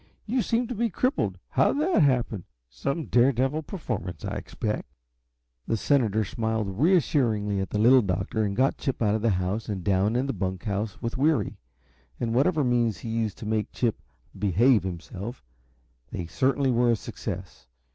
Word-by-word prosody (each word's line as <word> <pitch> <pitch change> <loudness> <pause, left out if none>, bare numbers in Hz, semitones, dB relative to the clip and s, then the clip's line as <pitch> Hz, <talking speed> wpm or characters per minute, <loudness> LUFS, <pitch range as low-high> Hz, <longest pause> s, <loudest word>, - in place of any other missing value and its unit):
You 245 +3 +1
seem 235 +2 +1
to 245 - -4
be 235 +1 0
crippled. 255 - 0
How - - +3
did 290 - 0
that 345 - +3
happen? 120 - +1 0.3
Some 140 - -2
dare 125 +3 +4
devil 135 +5 0
performance, 110 - -5
I - - -3
expect." - - -4 0.8
The 115 - +1
senator 110 -4 +2
smiled 110 -2 -2
reassuringly 125 - +2
at 95 - -2
the - - -2
Little 125 +5 +6
Doctor 95 +2 -1
and 100 -1 -1
got 130 +4 +2
Chip 135 -4 -2
out 105 -1 +3
of 110 - 0
the 115 - +2
house 95 +3 -1
and 95 -4 -3
down 100 +3 +2
in 125 +2 +1
the 135 - -2
bunk 95 -1 -3
house 105 -1 -3
with 115 +2 -3
Weary, 155 +2 +2 0.6
and 115 -1 -1
whatever 150 +5 +3
means 120 -5 +1
he 115 - -7
used 110 -3 -1
to - - -8
make 110 0 -1
Chip 120 -3 -1 0.3
"behave 105 +5 +3
himself," 95 - -6 0.7
they 90 - -4
certainly 135 - +1
were 120 0 +3
a 115 - +4
success. 100 - -7
115 Hz, 175 wpm, -26 LUFS, 100-135 Hz, 0.8 s, Little